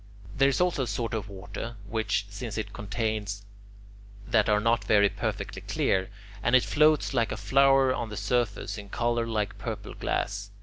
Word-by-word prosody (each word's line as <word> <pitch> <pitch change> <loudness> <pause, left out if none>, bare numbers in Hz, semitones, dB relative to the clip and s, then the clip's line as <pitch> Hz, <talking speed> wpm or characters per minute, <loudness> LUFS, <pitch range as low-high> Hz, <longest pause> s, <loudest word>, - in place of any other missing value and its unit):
There 135 +1 +4
is 140 - 0
also 180 -5 +2
a 130 - -1
sort 115 +1 -2
of 110 -2 -3
water 100 +4 -7
which, 105 -2 0
since 105 +1 -6
it 110 - -4
contains... 105 -1 -3 0.8
that 110 -2 +2
are 105 0 +4
not 115 +2 +2
perfectly 100 -1 +1
clear, 95 0 0 0.3
and 120 - +3
it 130 - +6
floats 150 -1 +3
like 115 -3 +1
a - - -3
flower 135 -1 +4
on 115 - -3
the 105 - -6
surface, 105 -1 -1
in 100 -1 -10
colour 120 +1 0
like 105 -3 -2
purple - - -5
glass. 100 0 -2
110 Hz, 170 wpm, -28 LUFS, 100-120 Hz, 0.8 s, it